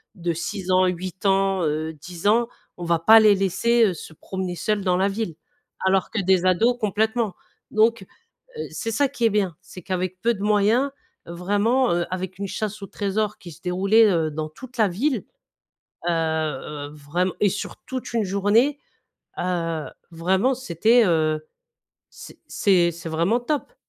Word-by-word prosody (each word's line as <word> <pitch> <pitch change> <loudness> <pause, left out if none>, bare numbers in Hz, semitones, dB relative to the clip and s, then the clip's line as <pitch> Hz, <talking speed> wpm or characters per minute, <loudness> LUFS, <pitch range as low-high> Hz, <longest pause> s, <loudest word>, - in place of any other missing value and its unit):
de 170 -2 -2
6 185 +3 -4
ans, 185 0 +5
8 180 +1 -5
ans, 195 -1 +2
heu, 155 +1 -1
10 170 +5 -6
ans, 235 +3 +3 0.3
on 175 - -8
va 170 -1 +1
pas 220 +6 +7
les 210 -1 +6
laisser, 200 +5 +2
heu, 190 - +1
se 160 - -10
promener 185 +2 -5
seuls 210 -2 0
dans 180 -1 +2
la 195 +1 +2
ville. 195 -5 -3 0.5
Alors 190 -1 +2
que 225 - -1
des 185 -1 +2
ados 225 +7 +3
complètement. 220 0 0 0.4
Donc, 225 +1 +3 0.6
heu, - - -3
c'est 225 -2 -4
ça 275 +6 +2
qui 240 - -2
est - - +5
bien, 195 -6 0
c'est 185 - -12
qu'avec 185 0 -3
peu 235 +1 +2
de 200 - -6
moyens 215 +6 +2 0.3
vraiment, 205 +9 +1
heu, 175 0 0
avec 185 0 -4
une 200 - -3
chasse 210 +1 -4
au - - -6
trésor 210 +2 -2
qui 175 - -10
se 165 - -15
déroulait, 195 +5 +4
heu, 160 -2 +1
dans 155 +1 -4
toute 255 +10 -13
la 220 -3 +4
ville, 250 +10 -1 0.8
heu, - - +2
heu, 155 -3 -2
vraiment 155 +5 -2
et 205 - +4
sur 205 +2 -4
toute 255 -2 -5
une 230 - +2
journée, 205 +9 +2 0.6
heu, 165 -3 -2 0.2
vraiment, 185 +9 +1
c'était, 235 0 +3
heu, 155 -2 +1 0.6
c - - -13
c'est 180 -4 +3
c'est 170 0 -8
vraiment 170 +9 +1
top. 300 - -3
190 Hz, 175 wpm, -23 LUFS, 170-220 Hz, 0.8 s, pas